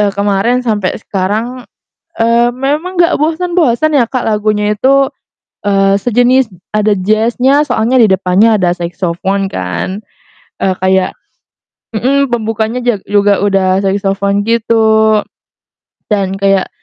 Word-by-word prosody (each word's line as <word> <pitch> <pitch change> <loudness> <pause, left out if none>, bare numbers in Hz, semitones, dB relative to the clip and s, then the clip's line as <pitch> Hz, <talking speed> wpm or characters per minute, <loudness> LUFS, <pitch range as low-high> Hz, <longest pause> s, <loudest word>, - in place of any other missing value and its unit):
eee, 205 -1 +2
kemarin 205 +5 +1
sampe 205 -4 0
sekarang, 220 +6 -3 0.6
eee, 235 +1 +3
memang 295 +8 -2
nggak 340 0 +3
bosen-bosen 310 -3 +1
ya 245 - +3
Kak 255 +2 -3
lagunya 210 -1 0
itu, 275 +4 +3 0.5
eee, 195 -1 +2
sejenis 245 0 +2 0.2
ada 215 0 +2
jazz-nya 230 +8 +2
soalnya 250 -2 +1
di 220 - +5
depannya 195 +4 +3
ada 175 -1 +1
saxophone 180 +3 -2
kan, 90 - -4 0.6
eee, 190 -1 +1
kayak 190 0 +2 0.8
hmm, 265 +4 0
pembukanya 225 +1 -2
ja 240 -3 +2
juga 205 -1 +1
udah 195 -1 +1
saxophone 200 +1 -1
gitu. 220 -2 +2 0.9
Dan 195 -2 -1
kayak, 195 -1 +1
215 Hz, 120 wpm, -12 LUFS, 195-245 Hz, 0.9 s, di